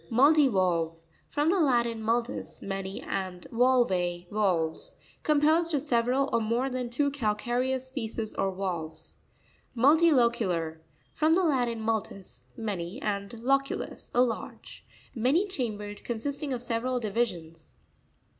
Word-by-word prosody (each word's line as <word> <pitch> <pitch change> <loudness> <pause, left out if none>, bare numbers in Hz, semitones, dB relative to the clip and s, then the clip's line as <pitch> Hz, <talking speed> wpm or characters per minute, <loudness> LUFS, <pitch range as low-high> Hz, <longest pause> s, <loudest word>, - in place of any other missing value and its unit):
Mu'ttivaLtve. 205 - +3 0.2
— - - -35
From 295 +3 +3
the 385 - +2
Latin, 235 -6 +2
multus, 230 +2 -2
many, 195 0 -4
and 185 -2 -4
valve, 190 -8 +2
valves. 200 - +1 0.3
Composed 310 +2 +3
cf 290 0 -1
several, 250 +1 +2
or 230 - +3
more 235 +5 0
than 250 -1 -3
two 285 +4 +1
calcareous 250 +2 -1
picces 225 -3 -3
or 195 - 0
valves. 165 -4 -5 0.6
Mutti.o'cutar.—From 235 - +2
the 375 - +2
Latin, 245 -8 +1
multus, 220 -3 -4
many, 205 -2 -4
and 200 -4 -2
loculus, 275 +2 -1
a 245 - +5
lodge. 235 -3 -5 0.3
Many 270 - +2
chambered; 215 - -4
consisting 280 +5 -3
of 250 -2 -2
several 245 +1 -1
divisions. 185 -8 -3
235 Hz, 115 wpm, -28 LUFS, 195-270 Hz, 0.6 s, a